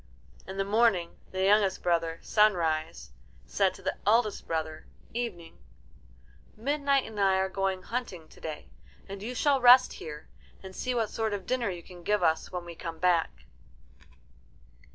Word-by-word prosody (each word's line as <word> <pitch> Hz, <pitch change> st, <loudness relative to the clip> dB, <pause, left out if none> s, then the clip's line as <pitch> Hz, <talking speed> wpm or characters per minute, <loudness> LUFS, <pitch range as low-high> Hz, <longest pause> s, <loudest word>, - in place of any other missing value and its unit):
In 190 Hz, -, -7 dB
the 195 Hz, -, 0 dB
morning 200 Hz, -5 st, +2 dB
the 190 Hz, 0 st, -2 dB
youngest 200 Hz, -1 st, +3 dB
brother. 165 Hz, -2 st, +1 dB
Sunrise, 165 Hz, -, +1 dB, 0.3 s
said -, -, +1 dB
to -, -, -14 dB
the -, -, -2 dB
eldest 215 Hz, -1 st, +2 dB
brother, 160 Hz, -1 st, -3 dB, 0.3 s
Evening, 225 Hz, -9 st, -5 dB, 1.0 s
"Midnight 280 Hz, +2 st, +1 dB
and 220 Hz, -2 st, -8 dB
I 195 Hz, -1 st, +4 dB
are 190 Hz, 0 st, +1 dB
going 190 Hz, -1 st, -2 dB
hunting 195 Hz, -9 st, -5 dB
to -, -, -18 dB
day, 155 Hz, -2 st, -7 dB, 0.4 s
and 195 Hz, 0 st, -8 dB
you 240 Hz, +4 st, -5 dB
shall 275 Hz, +1 st, +2 dB
rest 250 Hz, +1 st, +7 dB
here, 150 Hz, -1 st, -9 dB, 0.4 s
and 190 Hz, 0 st, -10 dB
see 255 Hz, -1 st, -2 dB
what 225 Hz, -3 st, 0 dB
sort 220 Hz, -2 st, -1 dB
of 195 Hz, -2 st, -7 dB
dinner 250 Hz, -4 st, 0 dB
you 175 Hz, -2 st, -6 dB
can 180 Hz, -2 st, -13 dB
give 205 Hz, +2 st, 0 dB
us 160 Hz, -1 st, +1 dB
when 180 Hz, -1 st, -5 dB
we 170 Hz, -, -8 dB
come 165 Hz, -1 st, -7 dB
back." 165 Hz, -, +1 dB
195 Hz, 160 wpm, -29 LUFS, 170-225 Hz, 1.0 s, rest